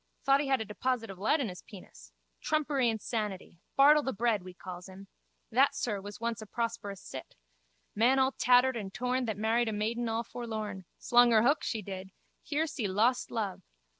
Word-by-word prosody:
Thought 275 +1 +4
he 290 - -3
had 265 -1 +2
a - - -3
deposit 225 +1 -2
of 185 - -11
lead 260 +10 +2
in 255 - -1
his 180 -2 -8
penis. - - -14 0.3
Trumpery 285 -5 +1
insanity. 210 -5 -4 0.2
Bartle 295 +2 +7
the 265 - -2
Bread 225 -2 +1
we 180 0 -11
calls 180 0 -9
him. 195 +1 -12 0.4
That, 265 +5 +4
sir, 210 -5 -2
was 205 +1 -9
once 230 -1 -2
a 215 - -9
prosperous 230 -4 -3
cit. - - -9 0.6
Man 245 +5 +3
all 265 0 +3
tattered 255 0 +4
and 200 -4 -5
torn 250 +3 -1
that 220 -3 -3
married 225 +2 +1
a - - -2
maiden 225 +3 -1
all 225 +1 -1
forlorn. 215 -5 -5
Slung 245 0 +5
her 225 -2 +5
hook, 285 +5 +3
she 220 -3 -2
did. 190 0 -7 0.3
Here 305 +2 -1
see 270 -9 -3
lost 225 +7 +1
love. 210 -5 -3
225 Hz, 195 wpm, -30 LUFS, 205-250 Hz, 0.6 s, Bartle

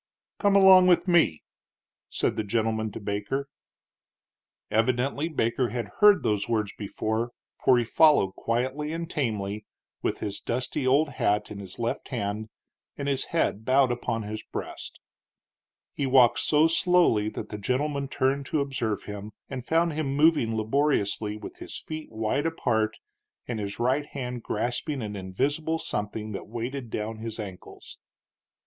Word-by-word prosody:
"Come 200 -1 +3
along 190 -2 +8
with 175 0 +4
me," 170 - +3 0.7
said - - 0
the 110 - -1
gentleman 110 0 -1
to - - -6
Baker. 105 +7 -3 1.2
Evidently 130 +7 +1
Baker 120 -4 0
had 120 -4 -4
heard 205 -2 +7
those 105 -1 0
words 110 -3 0
before, 110 +3 -2 0.3
for 125 - +6
he 120 - +2
followed 145 -7 +5
quietly 130 +8 -2
and 165 0 -3
tamely, 105 - -2 0.4
with - - -1
his 100 -1 -4
dusty 130 +2 -2
old 145 +4 +4
hat 105 -6 0
in 100 - -6
his 95 -2 -8
left 115 0 -2
hand 110 -3 -3 0.5
and 140 - -3
his 135 -2 +1
head 135 -10 0
bowed 130 +1 +4
upon 115 -2 -2
his 105 +1 -5
breast. - - -7 0.9
He 140 - -1
walked 130 -2 +5
so 155 +1 +4
slowly 165 - +3
that - - -7
the 105 - -6
gentleman 140 +6 -1
turned 135 0 0
to 155 - 0
observe 130 -7 -2
him, 105 +1 -7 0.2
and 130 -2 -4
found 165 +4 +2
him 145 -3 -2
moving 145 -7 +3
laboriously, 110 -3 +1
with - - -9
his - - -7
feet 155 -1 -7
wide 110 +7 0
apart 110 -9 0 0.5
and 120 -3 -3
his 100 -1 -4
right 130 +5 +1
hand 125 -3 -5
grasping 120 +5 -2
an 105 -1 -5
invisible 140 +12 -1
something 105 -5 -4
that 100 - -6
weighted 120 +3 -5
down 110 +1 -4
his 115 0 -6
ankles. 95 -4 -9
120 Hz, 150 wpm, -27 LUFS, 110-145 Hz, 1.2 s, along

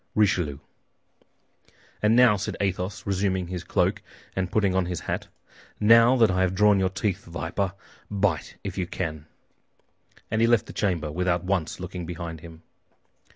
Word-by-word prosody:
"RICHELIEU" 90 -9 +2 1.4
"And 105 +2 +4
now," 125 -3 +6
said 105 +1 -4
Athos, 95 -1 -2
resuming 95 -2 0
his 90 -2 -4
cloak - - 0 0.3
and 95 -1 -2
putting 100 -3 +2
on 95 -1 +1
his 90 -2 -3
hat, - - -3 0.5
"now 115 +3 +6
that 115 -5 +4
I 95 0 +1
have 95 0 +1
drawn 105 0 +5
your 95 -1 +2
teeth, 95 +1 -2
viper, 90 +3 -3 0.4
bite 100 -5 -1
if - - -5
you 90 - -1
can." 80 -4 -4 1.0
And 110 +1 +1
he 115 - +5
left 120 -3 +3
the - - -10
chamber 85 -7 -1
without 90 +1 0
once 90 -4 -1
looking 90 -1 -6
behind 85 -1 -6
him. 80 0 -12
95 Hz, 155 wpm, -25 LUFS, 85-105 Hz, 1.4 s, now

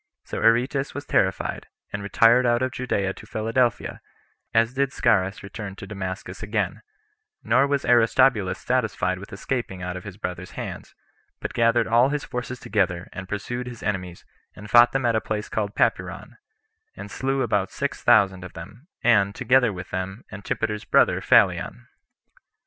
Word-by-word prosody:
So - - -5
Aretas 125 +5 +2
was 145 - -5
terrified, 95 0 0 0.3
and 100 - -3
retired 115 +5 +4
out 120 0 +2
of 130 - -1
Judea 100 -7 -1
to - - -13
Philadelphia, 115 +2 -1 0.5
as 115 +2 +2
did 135 0 +1
Scaurus 100 -7 +1
return 100 0 -7
to 100 - -9
Damascus 95 -2 -6
again; 105 -1 -2 0.6
nor 130 +4 +3
was 140 -1 -1
Aristobulus 115 -4 +3
satisfied 110 -7 -1
with 100 - -11
escaping 100 -3 -4
[out 90 0 -4
of 90 - -7
his 100 -2 -9
brother's 90 -3 -6
hands,] - - -7 0.4
but - - -5
gathered 115 0 +3
all 120 +4 +4
his 145 0 -2
forces 125 0 -5
together, 95 -4 -1
and 95 0 -8
pursued 120 +4 -4
his 120 -2 -9
enemies, 90 -4 -4 0.3
and 105 +2 -11
fought 120 +1 +7
them 135 -1 -1
at 115 -1 +2
a 110 - +1
place 105 -1 -4
called 105 -1 -2
Papyron, - - -1 0.6
and - - -9
slew 135 0 -1
about 100 -2 0
six 140 0 -4
thousand 95 -4 +4
of 90 - -9
them, 110 - -11 0.2
and, 100 -4 +3
together 125 -1 +3
with 90 -1 -8
them 95 +5 -4
Antipater's 105 +1 -3
brother - - +3
Phalion. - - +3
110 Hz, 160 wpm, -24 LUFS, 95-125 Hz, 0.6 s, fought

